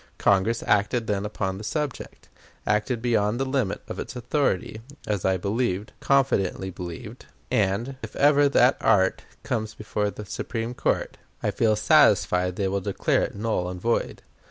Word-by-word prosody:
Congress 100 Hz, +4 st, +2 dB
acted 105 Hz, +3 st, +2 dB
then 105 Hz, -1 st, -1 dB
upon 95 Hz, -2 st, -3 dB
the -, -, -8 dB
subject 145 Hz, +4 st, -4 dB, 0.4 s
acted 105 Hz, +3 st, 0 dB
beyond 110 Hz, -1 st, +1 dB
the 135 Hz, -, 0 dB
limit 130 Hz, -6 st, -1 dB
of -, -, -6 dB
its -, -, -6 dB
authority, 125 Hz, -4 st, -1 dB, 0.2 s
as 105 Hz, -4 st, -2 dB
I 95 Hz, 0 st, +2 dB
believed, 100 Hz, 0 st, -1 dB
confidently 100 Hz, -9 st, +1 dB
believed; 90 Hz, -, -8 dB, 0.2 s
and, 110 Hz, +6 st, 0 dB
if -, -, -8 dB
ever 145 Hz, 0 st, +5 dB
that 130 Hz, -2 st, +4 dB
act 95 Hz, -4 st, +2 dB, 0.2 s
comes 110 Hz, -2 st, -3 dB
before 105 Hz, -1 st, -2 dB
the 105 Hz, +1 st, -8 dB
Supreme 115 Hz, +4 st, -4 dB
Court, -, -, -1 dB, 0.3 s
I -, -, +1 dB
feel 110 Hz, -2 st, +2 dB
satisfied 105 Hz, -, +4 dB
they 100 Hz, 0 st, 0 dB
will 100 Hz, +1 st, -1 dB
declare 100 Hz, +1 st, 0 dB
it -, -, -3 dB
null 100 Hz, -4 st, -1 dB
and 90 Hz, 0 st, -6 dB
void. 115 Hz, +5 st, -1 dB
105 Hz, 155 wpm, -25 LUFS, 95-120 Hz, 0.4 s, ever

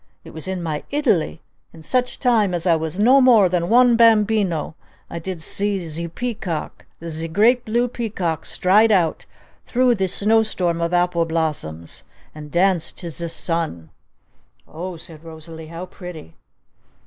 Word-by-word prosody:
It -, -, -13 dB
was 160 Hz, +3 st, -4 dB
in 190 Hz, -2 st, -3 dB
my 155 Hz, -3 st, -3 dB
Italy! 225 Hz, -, 0 dB, 0.3 s
In 160 Hz, -1 st, -13 dB
such 250 Hz, +9 st, -1 dB
time 220 Hz, -8 st, +2 dB
as 170 Hz, 0 st, -3 dB
I 170 Hz, -2 st, +4 dB
was 160 Hz, +2 st, -4 dB
no 255 Hz, +6 st, +5 dB
more 235 Hz, -7 st, +6 dB
than 175 Hz, -1 st, -1 dB
one 245 Hz, 0 st, +5 dB
bambino 210 Hz, -8 st, +3 dB, 0.4 s
I 170 Hz, -, -4 dB
did 170 Hz, -1 st, -6 dB
see 205 Hz, +3 st, +1 dB
zee 170 Hz, -1 st, -4 dB
peacock, 195 Hz, -4 st, -5 dB, 0.2 s
zee 165 Hz, 0 st, -3 dB
great 230 Hz, +9 st, +3 dB
blue 240 Hz, +2 st, +1 dB
peacock 195 Hz, -10 st, -3 dB
stride 210 Hz, +5 st, +3 dB
out 175 Hz, -6 st, +1 dB, 0.4 s
through 250 Hz, 0 st, +2 dB
zee 190 Hz, -1 st, 0 dB
snow 215 Hz, +5 st, +3 dB
storm 175 Hz, -6 st, -1 dB
of 170 Hz, 0 st, -1 dB
apple 175 Hz, -1 st, +1 dB
blossoms! 150 Hz, -, -3 dB, 0.3 s
And 150 Hz, -1 st, -10 dB
dance 175 Hz, 0 st, +1 dB
to 170 Hz, -2 st, -7 dB
zee 170 Hz, +2 st, -4 dB
sun!" 165 Hz, -, -3 dB, 0.8 s
"O 175 Hz, +3 st, -7 dB
h," 160 Hz, -, -11 dB
said 160 Hz, -2 st, -10 dB
Rosalee. 160 Hz, 0 st, -10 dB
"How 165 Hz, +3 st, -7 dB
pretty!" 180 Hz, -, -10 dB
175 Hz, 160 wpm, -21 LUFS, 160-215 Hz, 0.8 s, more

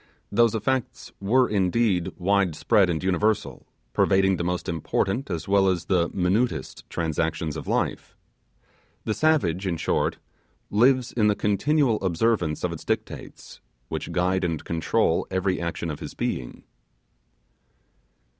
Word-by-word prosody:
Those 115 Hz, +1 st, +3 dB
effects 130 Hz, +3 st, -2 dB
were, 125 Hz, +6 st, +3 dB
indeed, 95 Hz, -2 st, +1 dB
wide 95 Hz, -2 st, +1 dB
spread 95 Hz, +2 st, +3 dB
and 80 Hz, -1 st, -1 dB
universal, 95 Hz, +4 st, 0 dB, 0.3 s
pervading 95 Hz, -1 st, +3 dB
the 85 Hz, -, -2 dB
most 90 Hz, 0 st, -2 dB
important 95 Hz, -, -1 dB
as 85 Hz, -4 st, -4 dB
well 100 Hz, 0 st, +4 dB
as 90 Hz, -3 st, 0 dB
the 90 Hz, -3 st, +1 dB
minutest 95 Hz, -, -1 dB
transactions 80 Hz, -1 st, -2 dB
of 80 Hz, -, -7 dB
life. -, -, -2 dB, 0.9 s
The 110 Hz, -, 0 dB
savage, 100 Hz, -, +1 dB
in 85 Hz, -3 st, -1 dB
short, -, -, 0 dB, 0.5 s
lives 125 Hz, +4 st, +3 dB
in 110 Hz, -3 st, +2 dB
the 105 Hz, -, +3 dB
continual 115 Hz, +4 st, +1 dB
observance 90 Hz, -3 st, 0 dB
of -, -, 0 dB
its -, -, -8 dB
dictates, -, -, -5 dB, 0.3 s
which -, -, -4 dB
guide 90 Hz, +1 st, +1 dB
and 85 Hz, -3 st, -2 dB
control 80 Hz, -1 st, +1 dB
every 95 Hz, -1 st, 0 dB
action 85 Hz, -1 st, -3 dB
of 75 Hz, -, -7 dB
his -, -, -8 dB
being. 65 Hz, -, -4 dB
95 Hz, 135 wpm, -25 LUFS, 85-110 Hz, 0.9 s, well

